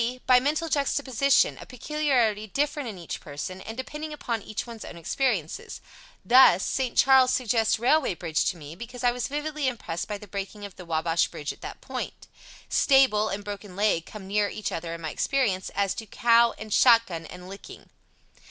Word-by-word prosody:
By 255 -1 +6
mental 300 +5 0
juxtaposition, 280 -2 +2
a - - -10
peculiarity 250 -6 0
different 290 +3 -1
in 205 - -8
each 170 -2 -6
person, 155 +6 -6
and 220 +4 -8
depending 300 +4 -6
upon 240 -7 -3
each 215 - -5
one's 230 -2 -9
own 170 - -9
experiences. 180 - -2 0.5
Thus, 240 -7 +6
"St. 260 -3 -2
Charles" 265 -1 +6
suggests 230 -3 +1
"railway 255 - +2
bridge" 165 -3 -1
to 185 - -1
me, 150 0 -10
because 240 +5 -9
I 245 - +4
was 245 -1 -3
vividly 295 0 -3
impressed 215 -9 -4
by 210 - -4
the 210 - -12
breaking 200 +1 -6
of 200 - -10
the 180 - -11
Wabash 165 0 +1
bridge 150 - -5
at - - -21
that - - -8
point. - - -6 0.4
"Stable" 260 -6 +4
and 205 +1 -4
"broken 205 -2 -8
leg" 200 -5 +1
come 210 -3 -9
near 205 +1 +1
each 215 - -4
other 165 0 -4
in 165 - -10
my 155 - -4
experience, 220 -9 0
as 200 -1 +1
do 220 - -7
"cow" 235 +1 +4
and 215 -1 -6
"shot 230 -2 +6
gun" 165 -4 -7
and 180 0 -11
"licking." 195 +1 -12
220 Hz, 190 wpm, -26 LUFS, 190-260 Hz, 0.5 s, By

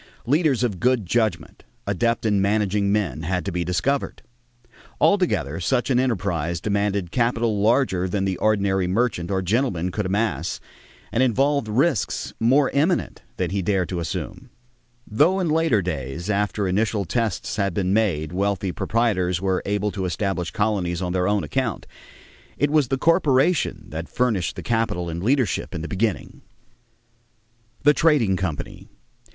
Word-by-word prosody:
Leaders 140 -1 +2
of 105 -7 -1
good 125 -1 +2
judgment, 110 +4 -1 0.2
adept 115 -1 0
in 105 -3 +2
managing 100 0 +1
men, 95 -10 -1
had 90 +3 -2
to 100 - -2
be 90 0 -1
discovered. 90 - -1 0.8
Altogether 110 - +2
such 125 +8 0
an 125 - +3
enterprise 85 - -1
demanded 100 -2 -1
capital 115 -3 +1
larger 105 -5 +2
than 95 +1 -1
the 95 -1 -1
ordinary 100 -3 +1
merchant 95 -3 0
or 95 -1 0
gentleman 90 -4 0
could 105 +1 -2
amass 105 +4 -1 0.5
and 120 - +1
involved 135 +1 +2
risks 130 +3 0
more 135 +5 +3
imminent 160 +6 0 0.2
than - - -1
he 100 0 -1
dared 95 -1 0
to 90 - -3
assume. 85 - -5 0.6
Though 160 - +2
in 180 -3 0
later 155 - +2
days, 80 +3 -4
after 105 0 0
initial 100 +1 0
tests 110 0 -2
had 100 -4 0
been 95 -1 0
made, 85 -8 +1
wealthy 100 0 -1
proprietors 95 -6 0
were 95 0 0
able 105 +1 0
to 95 -2 -3
establish 90 0 -2
colonies 95 -5 -1
on 90 0 -2
their 90 -1 +1
own 100 -2 +1
account, 75 - -2 0.7
it 145 0 +1
was 150 -4 +3
the 135 +2 0
corporation 160 0 +2
that 80 +2 -6
furnished 115 -9 0
the - - -7
capital 110 -7 -1
and 85 +1 -4
leadership 125 0 0
in 80 - -4
the - - -4
beginning. 100 +2 -2 1.4
=The 145 +1 +6
Trading 145 - +3
Company. 90 -5 -5
105 Hz, 150 wpm, -23 LUFS, 90-120 Hz, 1.4 s, =The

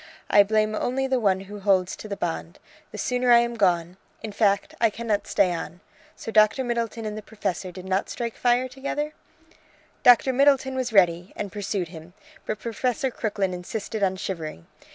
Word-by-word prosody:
I 205 - +8
blame 215 +1 +1
only 255 +5 -1
the 260 -1 +1
one 195 -4 +2
who 205 +2 -9
holds 190 -2 +2
to - - -9
the 200 -1 -5
bond. 80 - -4 0.3
The - - -8
sooner 250 0 0
I 240 - +9
am 235 0 +1
gone! 180 -4 +1 0.3
in 220 - -5
fact, 200 -1 +1
I 230 - +5
cannot 215 -1 -2
stay 185 -3 +2
on. 170 +1 -6 0.4
So 225 - -7
Dr. 215 +4 +4
Middleton 235 -2 -2
and 210 -1 -4
the 215 - -6
Professor 200 -4 -4
did 185 +1 -10
not 190 +1 -1
strike 235 -2 -4
fire 245 +1 +2
together?" 280 +3 -4 0.9
"Doctor 245 +2 +6
Middleton 270 0 +3
was 255 -2 -2
ready, 180 -3 +3
and 205 -2 -5
pursued 195 -3 -3
him, 165 +1 -12 0.3
but 215 - -2
Professor 245 +3 -2
Crooklyn 200 -5 -2
insisted 205 +4 -5
on 190 -1 +2
shivering. 160 - -5
210 Hz, 180 wpm, -25 LUFS, 190-240 Hz, 0.9 s, I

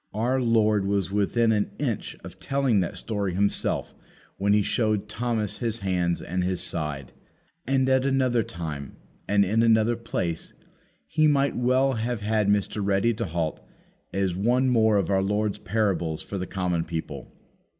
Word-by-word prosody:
Our 125 +4 +1
Lord 110 -4 +2
was 100 -2 0
within 110 +3 +2
an 105 -2 +1
inch 125 -8 -3
of - - -11
telling 135 -6 +1
that 90 - -2
story 100 -5 -3
Himself, 100 +1 0 0.4
when 100 +1 +1
He 105 0 +4
showed 110 -2 0
Thomas 110 -1 -2
His 115 -2 -1
hands 90 -3 0
and 90 +1 -2
His 90 0 -1
side. 75 -5 -2 0.6
And 135 0 +2
at 130 0 +3
another 130 -3 +2
time 80 -7 -6 0.3
and 100 0 +3
in 110 +4 +2
another 115 0 +4
place 90 -8 -4 0.6
we 155 0 +5
might 140 -1 +2
well 130 +2 +2
have 115 -1 -2
had 105 0 +1
Mr. 105 0 +1
Ready 100 +4 +2
to 115 +1 -3
halt 80 -3 -2 0.5
as 95 -2 -1
one 125 +7 +2
more 110 -3 +4
of 100 -1 0
our 95 -1 +3
Lord's 105 +1 -1
parables 90 -6 -1
for 100 - -5
the 90 - -4
common 90 -3 -1
people. 80 -5 -6
105 Hz, 160 wpm, -25 LUFS, 95-115 Hz, 0.6 s, we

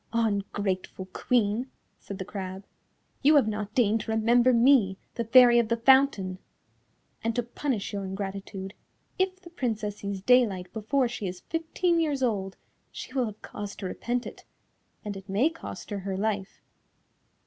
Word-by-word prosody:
"Ungrateful 200 -4 -1
Queen," 235 +1 +1 0.3
said 200 - -8
the 190 - -5
crab, 190 0 -6 0.6
"you 295 +3 +5
have 275 -6 +5
not 210 0 -4
deigned 225 -3 +3
to 220 - -5
remember 235 +3 +4
me, 235 -5 +4 0.2
the 235 - -2
Fairy 240 +1 +7
of 235 - +1
the 230 +1 0
Fountain; 230 -7 +4 0.8
and 230 0 -1
to 245 - +1
punish 240 -3 -3
your 200 -1 -3
ingratitude, 195 0 -5 0.5
if 375 0 0
the 345 -2 -14
Princess 220 - -2
sees 200 -1 -5
daylight 205 -7 +3
before 245 +4 +1
she 235 -4 -4
is 180 0 -6
fifteen 335 +2 0
years 290 -5 0
old, 195 -5 -1 0.3
she - - -8
will 255 -3 +1
have 210 -1 -10
cause 205 -1 -7
to 200 - -7
repent 240 +6 -2
it, - - -9 0.6
and 205 -1 -4
it 195 0 -10
may 235 +12 +2
cost 330 -8 -9
her 205 - -2
her 190 0 -4
life. 200 -1 -3
220 Hz, 160 wpm, -27 LUFS, 195-250 Hz, 0.8 s, Fairy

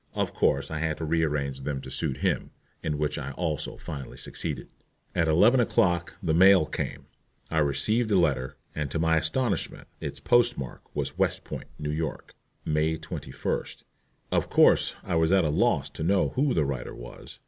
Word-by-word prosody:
Of - - -1
course 70 +2 +1
I 80 - -2
had 80 -1 -1
to 80 - -4
rearrange 75 -4 0
them 70 0 -3
to 65 -1 -9
suit 65 - -2
him, - - 0 0.3
in 75 -1 -2
which 75 0 -1
I 70 -1 -5
also 80 -1 -3
finally 70 -4 -7
succeeded. - - -4 0.5
At 85 - +2
eleven 105 +11 +5
o'clock 90 -7 +2
the 80 -3 +1
mail 95 0 +7
came. 75 - -4 0.5
I 80 - +2
received 105 - +2
a 105 - +3
letter, 70 -7 +1 0.2
and 75 -2 -3
to 75 - -2
my 80 0 +3
astonishment 105 - -1
its - - -5
postmark 120 - +1
was - - -3
"West - - +1
Point, - - -7
N. 75 0 -2
Y., 80 0 -1 0.5
May 80 +1 +1
21st." 80 - -4 0.5
Of - - +1
course - - +5
I - - -3
was 80 0 +3
at 95 -3 +4
a - - +1
loss 75 - +2
to - - -8
know 95 +4 +3
who 135 0 +1
the 80 - +2
writer 70 -3 -4
was. - - -11
80 Hz, 180 wpm, -27 LUFS, 70-90 Hz, 0.5 s, mail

